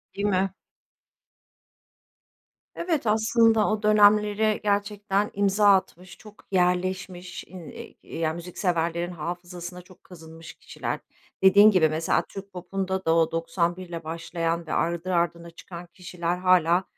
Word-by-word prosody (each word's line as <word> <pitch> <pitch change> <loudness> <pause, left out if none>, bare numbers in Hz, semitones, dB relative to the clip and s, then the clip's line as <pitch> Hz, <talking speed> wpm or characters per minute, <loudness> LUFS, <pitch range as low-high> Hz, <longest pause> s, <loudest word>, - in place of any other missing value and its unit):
Değil 200 - -2
mi? 190 -1 +1 2.2
Evet, 320 -9 -2
aslında 225 0 +3
o 215 0 -2
dönemlere 210 0 +4
gerçekten 205 0 0
imza 205 +1 +2
atmış 185 -1 -5
çok 210 -1 -16
yerleşmiş 180 0 -1
in 180 -3 -11 0.3
i - - -11
ya 160 -1 0
müzikseverlerin 170 0 -2
hafızasına 175 +2 -7
çok 185 0 -20
kazınmış 165 -2 -12
kişiler. - - -5 0.4
Dediğin 205 +3 +7
gibi 160 -5 +3
mesela 160 +1 0
Türk 195 0 -9
popunda 190 +1 -4
da 165 0 +3
o 165 -1 +2
91'le 170 +1 -2
başlayan 165 +1 -3
ve - - -3
ardı 170 +2 -1
ardına 170 0 -1
çıkan 170 +1 -11
kişiler 175 -1 -4
hâlâ, 180 -1 +3
180 Hz, 120 wpm, -25 LUFS, 170-200 Hz, 2.2 s, Dediğin